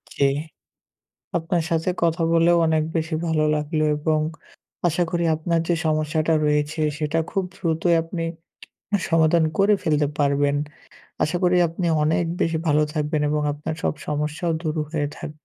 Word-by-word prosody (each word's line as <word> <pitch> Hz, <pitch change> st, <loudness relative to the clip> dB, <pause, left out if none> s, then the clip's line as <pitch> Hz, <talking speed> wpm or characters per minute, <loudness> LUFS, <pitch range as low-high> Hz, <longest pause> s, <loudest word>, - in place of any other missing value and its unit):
জি। -, -, +1 dB, 1.1 s
আপনার 170 Hz, +1 st, 0 dB
সাথে 165 Hz, +1 st, 0 dB
কথা 165 Hz, 0 st, +2 dB
বলেও 170 Hz, +1 st, +4 dB
অনেক 160 Hz, -1 st, +2 dB
বেশি 160 Hz, 0 st, -1 dB
ভালো 160 Hz, -2 st, +1 dB
লাগলো 155 Hz, +1 st, -1 dB
এবং 155 Hz, +1 st, +1 dB, 0.7 s
আশা 175 Hz, +1 st, +1 dB
করি 170 Hz, -1 st, 0 dB
আপনার 165 Hz, +2 st, 0 dB
যে 175 Hz, -, +2 dB
সমস্যাটা 155 Hz, +1 st, +1 dB
রয়েছে 150 Hz, +1 st, 0 dB, 0.2 s
সেটা 155 Hz, +1 st, -1 dB
খুব 195 Hz, -, 0 dB
দ্রুতই 170 Hz, -2 st, +1 dB
আপনি 165 Hz, +1 st, -5 dB, 0.7 s
অ্যা 205 Hz, -, +1 dB
সমাধান 165 Hz, 0 st, +4 dB
করে 200 Hz, +2 st, +4 dB
ফেলতে 150 Hz, -4 st, +2 dB
পারবেন। 140 Hz, 0 st, +2 dB, 0.7 s
আশা 155 Hz, +4 st, 0 dB
করি 180 Hz, 0 st, +4 dB
আপনি 170 Hz, +2 st, -3 dB, 0.2 s
অনেক 160 Hz, +3 st, +2 dB, 0.2 s
বেশি 165 Hz, 0 st, +1 dB
ভালো 150 Hz, -1 st, +3 dB
থাকবেন 150 Hz, -1 st, -1 dB
এবং 150 Hz, 0 st, 0 dB
আপনার 150 Hz, +2 st, -5 dB
সব -, -, 0 dB
সমস্যাও 150 Hz, +3 st, -1 dB
দূর 155 Hz, -1 st, -2 dB
হয়ে 150 Hz, -2 st, -1 dB
থাক -, -, -6 dB
160 Hz, 150 wpm, -23 LUFS, 150-170 Hz, 1.1 s, বলেও